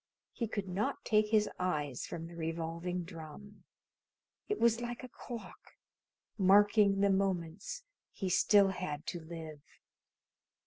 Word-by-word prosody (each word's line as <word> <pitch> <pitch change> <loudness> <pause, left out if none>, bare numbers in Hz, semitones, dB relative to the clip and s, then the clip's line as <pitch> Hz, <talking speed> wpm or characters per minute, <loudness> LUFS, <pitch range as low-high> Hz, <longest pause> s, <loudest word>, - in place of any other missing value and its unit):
He 230 - -3
could 205 -2 -3
not 215 +10 -2
take 215 -1 +3
his 210 -1 +3
eyes 150 -8 -1
from 165 - -5
the 170 +1 -10
revolving 165 +2 -3
drum. 170 +4 -10 0.9
It 420 - 0
was 235 0 +4
like 240 +1 -5
a - - -6
clock, 240 -1 -10 0.6
marking 200 +1 +5
the 200 0 +4
moments 195 - -1 0.3
he 195 - -4
still 200 +2 +5
had 180 -5 -4
to 175 - -4
live. 160 -2 -8
190 Hz, 130 wpm, -33 LUFS, 165-210 Hz, 0.9 s, marking